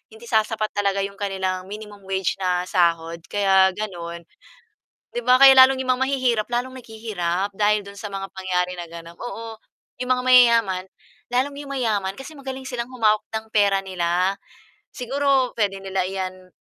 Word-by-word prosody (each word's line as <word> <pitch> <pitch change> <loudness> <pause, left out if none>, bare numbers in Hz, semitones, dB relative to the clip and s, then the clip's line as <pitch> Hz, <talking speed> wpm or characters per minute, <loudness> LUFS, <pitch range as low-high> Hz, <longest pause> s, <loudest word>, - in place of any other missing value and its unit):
hindi 220 - -15
sasapat 220 0 +1
talaga 200 -1 +1
yung 200 0 -6
kanilang 190 -2 -2
minimum 210 -1 -9
wage 190 -2 -1
na 180 -1 +1
sahod, 170 -1 +1
kaya 190 -2 +4
ganun. 170 -5 -6 0.9
'Di 240 - -2
ba 250 - +7
kaya 275 - +11
lalong 260 0 +8
'yong 255 - +1
mga 250 - -5
mahihirap 250 -5 +1
lalong 245 +2 -2
naghihirap 205 -5 -3
dahil 210 +1 +2
do'n 200 0 -11
sa 210 - -5
mga 195 0 -4
pangyayari 180 -1 -1
na 175 - -5
ganon 170 0 -11
oo, 230 -2 -7 0.4
'yong 250 - -3
mga 250 0 -2
mayayaman, 235 -7 +5 0.5
lalong 265 +3 0
'yong 280 -1 -8
mayaman 210 -7 0
kasi 270 +4 -9
magaling 265 -2 -7
silang 240 -1 -4
humawak 215 -4 +2
ng 220 0 -4
pera 200 -2 +3
nila. 180 0 0 0.6
Siguro 270 0 0
puwede 195 -3 0
nila 190 -1 -1
iyan, 185 -1 -5
205 Hz, 165 wpm, -23 LUFS, 190-245 Hz, 0.9 s, kaya